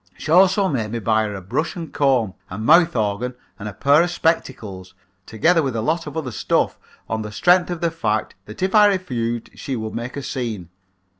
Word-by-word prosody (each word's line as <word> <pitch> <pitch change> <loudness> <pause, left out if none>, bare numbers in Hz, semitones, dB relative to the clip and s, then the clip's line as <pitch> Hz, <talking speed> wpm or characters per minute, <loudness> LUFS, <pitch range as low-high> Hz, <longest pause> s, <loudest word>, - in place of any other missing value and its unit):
She 155 - -5
also 190 +3 +5
made 115 - -2
me - - -1
buy 110 -1 +1
her 105 -1 -4
a 95 - -8
brush 155 - -2
and 165 -4 -7
comb, 130 -8 +2 0.2
a 90 - -6
mouth 165 +9 +4
organ 110 +3 -1 0.2
and 105 0 -5
a - - -9
pair 140 +8 +4
of 175 - +1
spectacles, 110 - -2 0.3
together 165 +10 +2
with 135 -5 -2
a 115 - -1
lot 165 +3 -1
of 150 +2 -6
other 140 -6 -3
stuff 100 - 0 0.3
on 110 0 -2
the 105 -1 -6
strength 180 - +3
of 175 -2 -4
the 170 -1 +1
fact 110 -10 -1
that 105 - -7
if 190 - 0
I 210 -1 +7
refused 120 - -2
she 135 - -5
would 110 -2 -5
make 120 +4 -5
a 140 - -4
scene. 110 -11 -4
125 Hz, 215 wpm, -21 LUFS, 110-165 Hz, 0.3 s, I